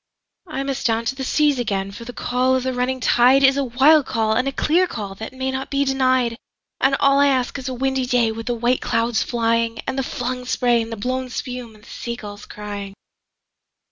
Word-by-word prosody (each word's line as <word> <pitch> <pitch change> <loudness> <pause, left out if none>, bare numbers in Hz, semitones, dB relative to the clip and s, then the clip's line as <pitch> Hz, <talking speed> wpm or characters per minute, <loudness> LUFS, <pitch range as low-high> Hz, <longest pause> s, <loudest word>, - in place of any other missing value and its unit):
I 275 -4 -3
must 275 -2 -1
down 225 0 0
to 250 - -1
the 265 - -5
seas 290 0 +2
again, 195 -4 -2
for 235 +4 -9
the 245 - -6
call 250 +2 0
of 260 - 0
the 260 0 -1
running 250 +1 -1
tideIs 265 +3 +5
a 280 - 0
wild 270 +4 +4
call 220 -2 +1
and 250 +4 +1
a - - 0
clear 340 +6 +2
call 205 - -6
that 220 +3 -7
may 260 0 -3
not 265 0 -4
be 280 0 +1
denied; 255 -3 +1 0.4
And 270 0 +3
all 275 0 +4
I 285 - +5
ask 260 0 0
is 265 0 -5
a - - -3
windy 265 0 -1
day 240 -3 +2
with 225 +1 -7
the 240 - 0
white 240 +2 +1
clouds 230 -1 0
flying, 230 -1 0
And 265 0 -2
the - - 0
flung 250 -1 -4
spray 240 -2 +2
and 225 0 -6
the 225 - -5
blown 255 +4 -2
spume, 245 -2 -6
and 210 - -19
the - - -17
sea 235 0 -5
gulls 205 -3 -10
crying. 205 -1 -7
250 Hz, 225 wpm, -21 LUFS, 230-265 Hz, 0.4 s, tideIs